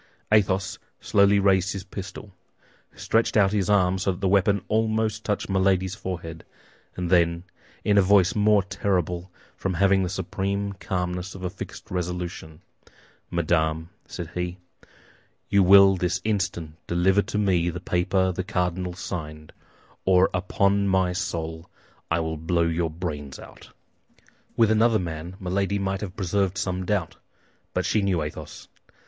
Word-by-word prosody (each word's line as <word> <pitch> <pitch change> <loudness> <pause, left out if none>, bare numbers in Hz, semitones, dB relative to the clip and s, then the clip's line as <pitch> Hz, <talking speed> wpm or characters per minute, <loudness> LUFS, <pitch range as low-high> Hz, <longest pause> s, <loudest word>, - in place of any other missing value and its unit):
Athos 95 -2 +2 0.2
slowly 100 0 +4
raised 95 -1 +3
his 100 -2 -5
pistol, 100 +1 -8 0.6
stretched 115 0 +1
out 100 -2 +4
his 100 -3 0
arm 95 -2 +3
so 95 - 0
that 90 - -6
the 100 - 0
weapon 100 0 +3
almost 110 0 0
touched 105 -2 -2
Milady's 95 -1 +1
forehead, 85 -5 -6 0.5
and 90 -1 -3
then, 85 -1 +3 0.4
in 100 -1 +4
a - - +7
voice 95 -1 +4
the - - -2
more 105 -1 +4
terrible 90 -2 -2 0.2
from 95 -2 -3
having 95 +2 +3
the 90 - -1
supreme 100 +2 -2
calmness 90 -1 -3
of 95 - -9
a 90 - -2
fixed 95 - -9
resolution, 90 -2 -5 0.7
"Madame," 80 -1 0 0.2
said 85 -2 -7
he, 90 0 -3 0.9
"you 100 0 +4
will 95 +1 +7
this 90 0 -1
instant 90 -7 -2
deliver 95 +3 +3
to 105 - -4
me 90 -4 +2
the 90 +1 -5
paper 95 +2 +1
the 95 +1 -3
cardinal 90 0 -2
signed; 75 -4 -7 0.5
or 95 0 +4
upon 100 +2 +1
my 95 -2 +2
soul, 80 -1 -4 0.4
I 80 0 +1
will 80 0 -3
blow 85 +2 0
your 85 0 0
brains 75 -4 -5
out." - - -13 0.9
With 115 -2 +4
another 110 +1 +4
man, 85 -1 -5
Milady 100 +1 -1
might 95 -1 -2
have 95 -4 -6
preserved 95 0 0
some 90 -1 -2
doubt; 95 -5 -1 0.6
but - - 0
she 105 - +2
knew 95 -5 +1
Athos. 75 - -8
95 Hz, 150 wpm, -25 LUFS, 85-100 Hz, 0.9 s, a